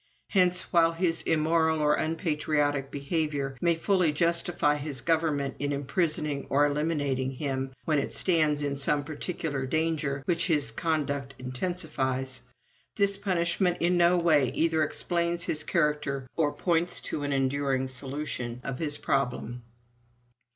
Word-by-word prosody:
Hence, 180 -2 +2
while 165 -1 +4
his 165 -1 +1
immoral 160 0 +1
or 150 0 +3
unpatriotic 150 -4 -1
behavior 140 -1 -2
may 170 -1 +3
fully 180 -1 +1
justify 170 -1 +2
his 145 -2 -2
government 155 -3 0
in 145 0 -1
imprisoning 145 0 -1
or 145 +2 +3
eliminating 145 -3 -1
him 135 -1 -3
when 155 -2 +2
it 140 - -3
stands 155 -5 +3
in 140 -1 -2
some 145 +1 +2
particular 145 -2 -4
danger 150 -2 -1
which 170 +1 +1
his 150 -8 +2
conduct 140 -2 -2
intensifies, 130 -2 -2 0.5
this 200 -1 +4
punishment 180 -2 0
in 175 +1 +3
no 175 +1 +4
way 155 -6 +3
either 160 -1 +2
explains 170 +2 0
his 150 -1 0
character 150 -5 -1
or 150 -3 +1
points 170 +1 -1
to 150 - -4
an 145 0 -2
enduring 135 -1 0
solution 130 -2 -5
of 135 -2 -5
his 150 -2 +2
problem. 125 -3 -2
150 Hz, 135 wpm, -27 LUFS, 140-165 Hz, 0.5 s, while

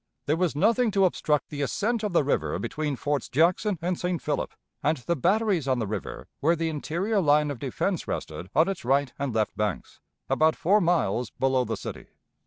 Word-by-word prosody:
There 150 - +2
was 170 -3 0
nothing 225 +8 +3
to 195 -2 +4
obstruct 150 -4 0
the 145 -1 -4
ascent 220 - 0
of 210 -2 -2
the 170 - +3
river 140 - 0
between 150 -2 -2
Forts 145 0 -2
Jackson 180 - +2
and 180 0 -1
St. 180 -1 -1
Philip 150 -1 -2 0.3
and 155 +2 +1
the 155 +7 -1
batteries 190 - +1
on 130 -1 +2
the 115 - -1
river 105 -1 -5
where 165 +4 +3
the 165 0 -1
interior 175 +8 -1
line 150 -2 +3
of 135 - -6
defense - - -2
rested 90 - -5
on 160 - +5
its 195 -1 -3
right 135 +1 +1
and 140 -2 -1
left 110 -1 0
banks, 105 -4 -3 0.3
about 155 +4 +3
four 205 +5 +3
miles 125 - +1
below 130 -1 +1
the 110 -1 -3
city. - - -7
155 Hz, 195 wpm, -26 LUFS, 135-180 Hz, 0.3 s, on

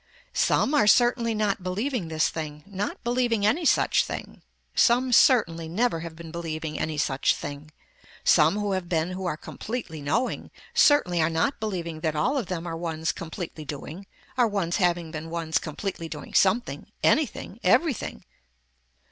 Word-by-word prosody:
Some 280 - +2
are 285 -8 +4
certainly 240 0 +4
not 210 -2 0
believing 200 +3 -2
this 160 -1 +1
thing, 150 -2 -6
not 200 0 -4
believing 240 -3 +1
any 310 +11 +2
such - - +4
thing, - - -7 0.3
some 250 +1 +3
certainly 170 - +4
never 210 0 +1
have 165 -1 -7
been 165 -1 -10
believing 160 -2 -4
any 155 -1 -2
such 140 -2 +1
thing, 145 +1 -7 0.5
some 160 +6 +5
who 205 -1 -1
have 185 -2 -2
been 165 0 0
who 185 0 -4
are 155 - -2
completely 210 -6 -6
knowing, 225 - -1 0.2
certainly 180 - +4
are 155 - +3
not 165 - 0
believing 175 -7 -4
that 155 -1 -1
all 245 - +1
of 250 -9 -1
them 175 -2 -4
are 165 -1 -4
ones 160 -1 -2
completely 160 -1 -7
doing, 155 +6 -7 0.3
are 240 - +5
ones 195 -5 -1
having 175 -3 +1
been 160 0 -6
ones 165 -1 -1
completely 165 +1 -5
doing 150 -2 -8
something, 200 +6 +1
anything, 305 -2 +1
everything. 310 - +1
175 Hz, 160 wpm, -26 LUFS, 160-220 Hz, 0.5 s, some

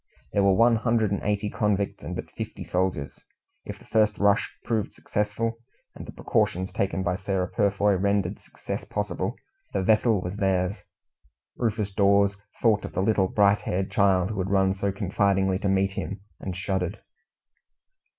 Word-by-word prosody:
There 100 - +3
were 100 -1 +4
one 115 +2 +5
hundred 115 -2 +1
and 100 - -1
eighty 105 0 0
convicts 105 -2 -1
and - - -5
but - - -6
fifty - - -6
soldiers. 90 -6 -2 0.5
If - - -7
the - - -18
first 110 -1 +2
rush 100 0 +2
proved 110 -3 -2
successful 110 +3 -2 0.3
and - - -10
the - - -7
precautions 95 +2 0
taken 95 -1 -1
by 90 0 0
Sarah 95 -2 -1
Purfoy 100 0 +2
rendered 100 -1 0
success - - -6
possible 105 +2 -3 0.4
the 95 - 0
vessel 110 +1 +3
was 90 +2 -5
theirs. 95 0 0 0.7
Rufus 110 -4 -1
Dawes 100 0 +4 0.3
thought 110 -3 +4
of - - -7
the 95 - 0
little 100 -2 +2
bright 100 +1 +3
haired 95 +1 -2
child 95 -1 +3
who 105 - -4
had 95 +1 -1
run 95 -1 +3
so 100 +1 -1
confidingly 95 -1 +1
to 100 - -1
meet 95 0 +2
him, 95 0 -5 0.2
and 95 -2 -5
shuddered. 95 +1 -2
100 Hz, 165 wpm, -26 LUFS, 95-105 Hz, 0.7 s, one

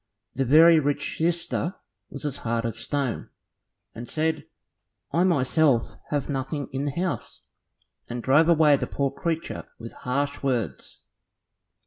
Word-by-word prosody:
The 135 +1 0
very 160 +5 +7
rich 145 0 -1
sister 170 +2 -1 0.3
was - - -8
as 145 - -2
hard 115 0 -2
as 115 -2 -2
a - - -8
stone, 140 -5 -2 0.6
and 115 +1 -8
said, 160 0 -1 0.7
"I 170 - +2
myself 145 -6 +2
have 145 -2 -1
nothing 140 +1 -3
in 135 +1 -2
the 145 - -1
house," 180 -1 -3 0.7
and 120 0 -4
drove 150 +5 +4
away 155 -4 +5
the - - -3
poor 140 -1 -1
creature 165 +2 -3
with 115 - -9
harsh 140 +3 -2
words. 125 -6 -3
145 Hz, 140 wpm, -25 LUFS, 130-160 Hz, 0.7 s, very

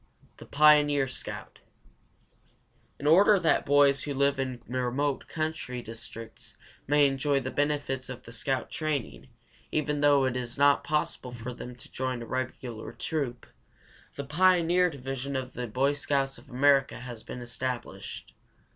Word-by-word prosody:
THE - - -12
PIONEER 145 -2 +5
SCOUT. 130 - -7 1.4
In 140 - -8
order 195 +7 +6
that 165 -3 +2
boys 140 -1 +5
who 145 -1 -3
live 140 0 +2
in 130 -3 -3
remote 130 +3 -1
country 155 -6 -3
districts 115 0 -9 0.3
may 145 +1 +5
enjoy 140 +1 +1
the 130 0 -4
benefits 145 -3 -1
of 130 - -7
the 115 - -11
scout 130 +3 -2
training, 150 -5 -3 0.4
even 150 -1 0
though 145 -2 +5
it 130 -1 -1
is 125 0 -4
not 140 0 +4
possible 150 -4 -1
for 120 +1 -6
them 125 0 -8
to - - -14
join 130 -2 -3
a - - -7
regular 125 -2 -4
troop, 140 -7 -3 0.7
the 140 - -4
Pioneer 180 +3 +4
Division 135 -1 -5
of 130 -1 -3
the 125 -1 -4
Boy 135 +6 +1
Scouts 135 -2 -1
of 135 +4 -19
America 135 0 +3
has 120 -3 -8
been 125 - -8
established. 125 +1 -5
135 Hz, 145 wpm, -28 LUFS, 125-145 Hz, 1.4 s, order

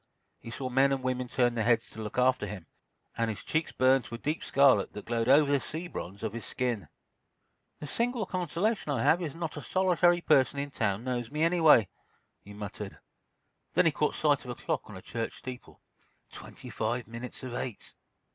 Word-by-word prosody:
He - - -10
saw 130 +3 -4
men 135 +2 +4
and 135 -1 -1
women 130 0 -1
turn 120 0 +2
their 115 -2 0
heads 115 0 +2
to 110 - -8
look 105 +1 -6
after 125 -3 +3
him, 95 -4 -7 0.5
and 115 -1 0
his 110 - -5
cheeks 160 0 -1
burned 130 0 +3
to 110 - -6
a - - -6
deep 150 +6 -3
scarlet 135 -7 +4
that 105 - -8
glowed 115 0 0
over 145 +1 +6
the 140 - +4
sea 160 +6 -6
bronze 100 - -7
of 110 -2 -2
his 115 -2 -5
skin. 120 -4 -2 0.9
"The - - -6
single 235 - 0
consolation 185 +1 -1
I 140 - 0
have 175 - +4
is 155 -5 -3
that - - -13
not 165 -3 -4
a - - -4
solitary 175 +2 +3
person 135 -3 +3
in 140 0 -3
town 105 -3 -1
knows 120 -2 -2
me, 150 +3 -1
anyway," 160 - +5 0.6
he 100 - -12
muttered. 105 -1 -7 0.8
Then - - +5
he - - +5
caught - - 0
sight - - +2
of - - -10
a - - -4
clock - - -3
on - - -8
a 95 - -12
church 115 -1 -4
steeple—twenty 125 -1 -12
five 115 +2 -2
minutes 120 +3 -8
of 130 -2 -5
eight. 120 -3 -5
130 Hz, 205 wpm, -29 LUFS, 115-150 Hz, 0.9 s, over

